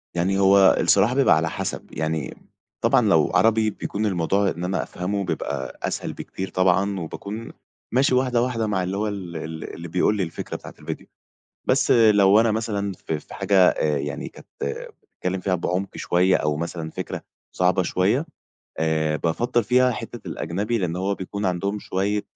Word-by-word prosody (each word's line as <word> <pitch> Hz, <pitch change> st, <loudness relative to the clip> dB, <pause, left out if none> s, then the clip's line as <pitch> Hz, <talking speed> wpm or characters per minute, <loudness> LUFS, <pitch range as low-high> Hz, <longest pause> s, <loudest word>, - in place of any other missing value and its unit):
يعني 95 Hz, +3 st, +1 dB
هو 95 Hz, 0 st, +6 dB
الصراحة 120 Hz, +4 st, +4 dB
بيبقى 140 Hz, -, +5 dB
على 80 Hz, +1 st, 0 dB
حسب. -, -, -4 dB
يعني 80 Hz, -3 st, -2 dB, 0.4 s
طبعًا -, -, +4 dB
لو -, -, +4 dB
عربي 110 Hz, -1 st, +4 dB
بيكون 105 Hz, 0 st, -3 dB
الموضوع 95 Hz, +1 st, +1 dB
إن 85 Hz, -, -5 dB
أنا 90 Hz, +1 st, -1 dB
أفهمه 100 Hz, +2 st, -3 dB
بيبقى 70 Hz, -6 st, -4 dB
أسهل -, -, -2 dB
بكتير 95 Hz, 0 st, -6 dB
طبعًا، 95 Hz, +1 st, +2 dB
وباكون 100 Hz, +7 st, -6 dB, 0.4 s
ماشي 130 Hz, +1 st, +3 dB
واحدة 125 Hz, -2 st, +2 dB
واحدة 120 Hz, -3 st, 0 dB
مع 95 Hz, -3 st, 0 dB
اللي 95 Hz, +2 st, -2 dB
هو 105 Hz, +1 st, 0 dB
ال 95 Hz, -5 st, -5 dB
ال 80 Hz, 0 st, -6 dB
اللي 85 Hz, +1 st, -7 dB
بيقول 90 Hz, +5 st, +1 dB
لي 95 Hz, -, +1 dB
الفكرة 80 Hz, -, -5 dB
بتاعة -, -, -9 dB
الڤيديو. -, -, -6 dB, 0.6 s
بس -, -, +3 dB
لو 105 Hz, -3 st, +6 dB
أنا 115 Hz, -1 st, +3 dB
مثلًا 105 Hz, -2 st, -2 dB
في 80 Hz, -3 st, -4 dB
في -, -, -14 dB
حاجة 100 Hz, -, 0 dB
آآ 75 Hz, -1 st, 0 dB
يعني 70 Hz, +1 st, -4 dB
كانت -, -, -15 dB, 0.7 s
بتتكلّم 90 Hz, +1 st, -2 dB
فيها 90 Hz, 0 st, 0 dB
بعمق 90 Hz, +3 st, -2 dB
شويّة 90 Hz, +2 st, +3 dB
أو 75 Hz, -1 st, 0 dB
مثلًا 85 Hz, -1 st, -4 dB
فكرة -, -, -5 dB, 0.3 s
صعبة 90 Hz, 0 st, +2 dB
شويّة 105 Hz, -, +1 dB, 0.5 s
آآ، 80 Hz, -1 st, +1 dB
بافضَّل 115 Hz, +9 st, 0 dB
فيها 125 Hz, +3 st, +4 dB
حتّة -, -, -7 dB
الأجنبي، 105 Hz, +8 st, -2 dB
لأن 90 Hz, -3 st, -2 dB
هو 95 Hz, +2 st, 0 dB
بيكون 100 Hz, +2 st, -5 dB
عندهم 100 Hz, +3 st, -1 dB
شويّة 100 Hz, +1 st, -1 dB
95 Hz, 170 wpm, -23 LUFS, 85-105 Hz, 0.7 s, هو